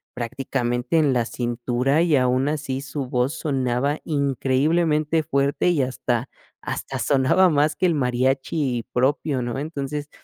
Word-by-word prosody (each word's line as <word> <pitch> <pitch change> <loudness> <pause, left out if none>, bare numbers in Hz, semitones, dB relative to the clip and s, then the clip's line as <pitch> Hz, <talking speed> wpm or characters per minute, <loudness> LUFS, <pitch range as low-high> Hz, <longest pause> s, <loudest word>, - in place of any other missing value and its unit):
prácticamente 125 +3 -2
en 145 -4 +3
la 120 -2 +1
cintura 120 +5 0
y 160 -4 +3
aun 130 +2 +2
así 140 -3 -3
su 140 0 -5
voz 125 +1 0
sonaba 135 0 0
increíblemente 150 +3 +1
fuerte 140 +2 +1
y 160 -6 +2
hasta 125 -1 -2 0.3
hasta - - -5
sonaba 145 +7 +3
más 150 -1 +2
que - - +1
el 170 - +1
mariachi 130 0 0
propio, 135 +2 +1
¿no?, 120 0 -3
entonces, 145 -1 -4
135 Hz, 135 wpm, -23 LUFS, 125-150 Hz, 0.3 s, en